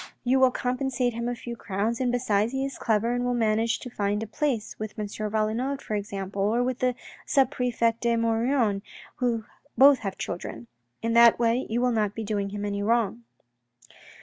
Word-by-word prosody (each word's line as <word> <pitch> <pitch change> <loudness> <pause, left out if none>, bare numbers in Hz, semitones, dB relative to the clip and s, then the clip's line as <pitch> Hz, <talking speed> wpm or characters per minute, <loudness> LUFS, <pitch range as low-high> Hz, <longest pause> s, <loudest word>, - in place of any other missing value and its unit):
You 255 +2 +3
will 260 -1 +6
compensate 250 0 -1
him 235 +1 -3
by 245 - -1
a - - -6
few 235 0 -7
crowns 215 +2 -2
and 250 -2 +1
besides 230 -2 +1
he 270 0 -1
is 275 - -6
clever 225 +1 +1
and 245 0 -1
will 245 0 0
easily 240 - -1
manage 225 +2 +1
to 250 - -7
find 205 0 -1
a - - -3
place, 230 -1 -2
with 215 -1 -6
M. 210 - -2
Valenod 215 +6 -1
for 220 - -6
example, 200 -1 -3
or 225 +5 +2
with 255 0 -2
the 250 -1 +1 0.3
sub 270 -2 +3
prefect 235 -3 0
De 235 -1 +2
Maugiron 230 -2 +1 0.4
who 235 -3 0 0.3
both 275 +2 +7
have 195 -3 -5
children. 120 -9 -5 0.4
In 230 0 0
that 235 0 +7
way 235 +2 +1
you 235 +2 0
will 250 0 +2
not 210 -3 0
be 225 - -4
doing 205 -2 -2
him 205 +1 -4
any 200 0 -2
wrong. 230 +1 0
230 Hz, 200 wpm, -26 LUFS, 210-245 Hz, 0.4 s, both